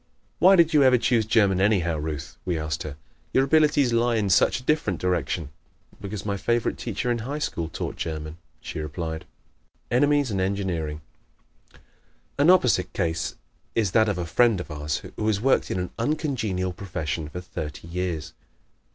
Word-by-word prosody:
"Why 190 +1 +7
did 170 -3 +4
you 150 - +6
ever 130 -2 +6
choose 115 -2 +1
German, 100 -5 +3
anyhow, 95 -5 +2
Ruth?" 75 -2 -5
we 90 -3 -1
asked 75 -1 -3
her. 75 -1 -6 0.4
"Your 130 - +4
abilities 145 -3 +3
lie 120 0 +2
in 105 -3 +1
such 95 - +4
a - - -14
different 130 - 0
direction." 85 -3 -1 0.5
"Because 100 -1 -6
my 100 -1 -1
favorite 120 +3 0
teacher 125 - -2
in 120 - 0
high 135 +6 -4
school 85 - -3
taught - - -5
German," 80 -1 -5 0.2
she - - -6
replied. 80 +1 -4 0.7
Enemies 145 +1 +3
and 95 -2 0
Engineering 90 -6 -2 0.7
¶ - - -20 0.6
An 145 +4 +5
opposite 125 - +4
case 80 0 -1 0.4
is 110 -5 +1
that 110 +1 +4
of 100 - -1
a 90 - -2
friend 110 +5 +3
of 90 - -7
ours 75 0 -3
who 110 - -1
has 105 -2 +2
worked 135 +5 +2
in - - -1
an 90 - -3
uncongenial 115 - -1
profession 80 -5 -4
for 90 - -6
thirty 80 -3 -7
years. 85 -3 -3
95 Hz, 170 wpm, -25 LUFS, 80-120 Hz, 0.7 s, Why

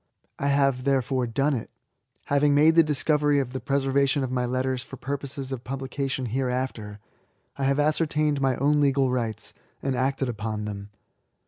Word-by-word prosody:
I 140 - 0
have, 140 -2 +2
therefore, 130 -2 +1
done 135 +6 +1
it. 120 -5 -4 0.6
Having 145 0 +3
made 155 +3 +6
the 165 - +7
discovery 150 -1 +2
of 130 -2 -3
the 130 - -3
preservation 140 0 +1
of 130 - -3
my 125 -1 0
letters 130 0 -1
for 135 +2 -10
jpurposes 140 0 -5
of 130 -2 -5
publication 135 0 -3
hereafter, 125 -3 -2 0.6
I 135 - -2
have 135 +1 +2
ascer 155 +2 +2
tained 150 -1 0
my 135 -2 +2
own 145 +3 +2
legal 135 -2 +2
rights, 115 -4 -3 0.3
and 135 -2 -2
acted 135 +1 0
upon 110 -2 -3
them. 100 -1 -6
135 Hz, 165 wpm, -25 LUFS, 125-140 Hz, 0.6 s, the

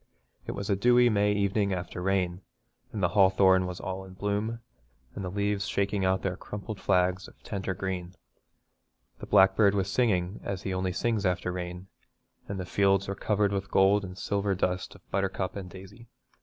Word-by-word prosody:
It - - -3
was 100 0 -5
a 100 - +2
dewy 120 +4 +5
May 105 -1 +2
evening 100 0 +1
after 90 0 -5
rain, 90 -1 0 0.5
and 105 -3 -4
the 90 - +4
hawthorn 95 -1 +4
was 90 0 -6
all 95 0 -5
in 95 -1 -12
bloom, 105 +4 -2 0.5
and 100 - -6
the 90 - -3
leaves 100 +1 -1
shaking 100 0 0
out 95 0 +1
their 95 -1 -1
crumpled 100 +2 -7
flags 90 0 +1
of - - -18
tender 95 -2 -3
green. 90 -1 -4 1.0
The - - -8
blackbird 95 +1 +5
was 95 -1 0
singing 95 -5 +1
as 100 -1 -4
he 95 - -2
only 95 0 -1
sings 110 +2 0
after 90 -1 0
rain, 90 0 -5 0.6
and 100 -1 -4
the 90 - -4
fields 100 +1 +2
were 100 - -2
covered 100 0 0
with 100 -1 -1
the - - -23
gold 100 +2 +4
and 90 -1 -8
silver 100 -1 -1
dust 90 0 -2
of - - -19
buttercup 95 -1 -1
and 95 -3 -6
daisy. 95 +6 -12
95 Hz, 185 wpm, -28 LUFS, 95-100 Hz, 1.0 s, dewy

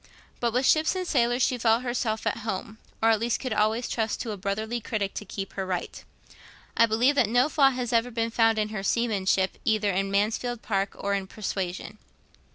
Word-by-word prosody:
But 235 -1 0
with 250 +3 +1
ships 310 +5 +3
and 370 0 -2
sailors 245 -3 +2
she 250 - +1
felt 225 +1 +3
herself 240 -3 -2
at - - 0
home, 220 0 -5 0.2
or 225 - +6
at 220 - +2
least 230 +1 0
could 255 -4 -3
always 215 +3 +1
trust 220 -2 -2
to 230 - -4
a - - -3
brotherly 215 +4 -3
critic 210 -3 -2
to 210 - -6
keep 195 0 -6
her 195 - -3
right. 185 -2 -4 0.7
I 230 - +5
believe 235 +6 +3
that 250 -7 +2
no 245 +5 +3
flaw 280 -3 +5
has 250 -2 -3
ever 230 +1 +2
been 230 -1 -2
found 225 -1 +3
in 215 0 0
her 215 -2 -4
seamanship 195 -3 0
either 215 -2 +2
in 195 +1 -1
'Mansfield 220 +4 -1
Park' 195 -2 -1
or 200 - -2
in 195 -1 -2
'Persuasion.' 195 0 -5
220 Hz, 205 wpm, -26 LUFS, 200-240 Hz, 0.7 s, or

